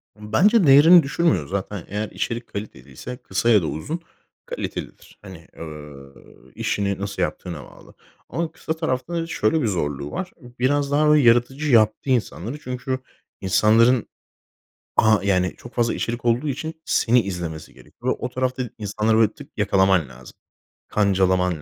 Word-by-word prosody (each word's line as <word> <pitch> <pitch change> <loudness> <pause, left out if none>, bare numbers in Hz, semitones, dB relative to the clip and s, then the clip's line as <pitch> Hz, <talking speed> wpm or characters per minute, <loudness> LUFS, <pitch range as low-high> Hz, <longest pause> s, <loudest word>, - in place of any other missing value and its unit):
Bence 165 - +3
değerini 160 +5 +8
düşürmüyor 140 - +1
zaten. 100 -1 -4
Eğer 105 +2 -3
içerik 120 0 -4
kaliteliyse, 100 - -8
kısa 95 +1 -1
ya 105 -4 +6
da - - -3
uzun 150 - -4 0.5
kalitelidir, - - -7
hani, 95 -5 -12
ööö, 75 -4 -10 0.4
işini 100 -1 -1
nasıl 100 0 -4
yaptığına 85 -5 -4
bağlı. - - -16 0.4
Ama 165 -1 -3
kısa 160 -1 -4
tarafta 160 -1 -3
da 165 -1 -2
şöyle 155 0 +1
bir 120 - +1
zorluğu 75 -7 -2
var. 185 0 -4 0.3
Biraz 140 +2 +1
daha 150 +1 +4
yaratıcı 135 +3 +3
yaptı 110 +2 +3
insanları 120 - -1
çünkü 130 -1 -4 0.4
insanların, 110 +5 +4 0.9
a 110 -1 +5
yani, 90 -2 +1
çok 120 - -13
fazla 120 -1 +1
içerik 120 +1 -4
olduğu 120 +5 +1
için 160 +4 -5
seni 120 +1 +3
izlemesi 85 -6 -6
gerekiyor. 125 +1 -4
O 125 - -3
tarafta 130 0 -2
insanları, 105 +1 0
böyle, 110 -1 +3
tık, - - -13
yakalaman 95 - +2
lazım. 65 0 -13 0.5
Kancalaman 95 -4 +1
110 Hz, 140 wpm, -22 LUFS, 95-130 Hz, 0.9 s, değerini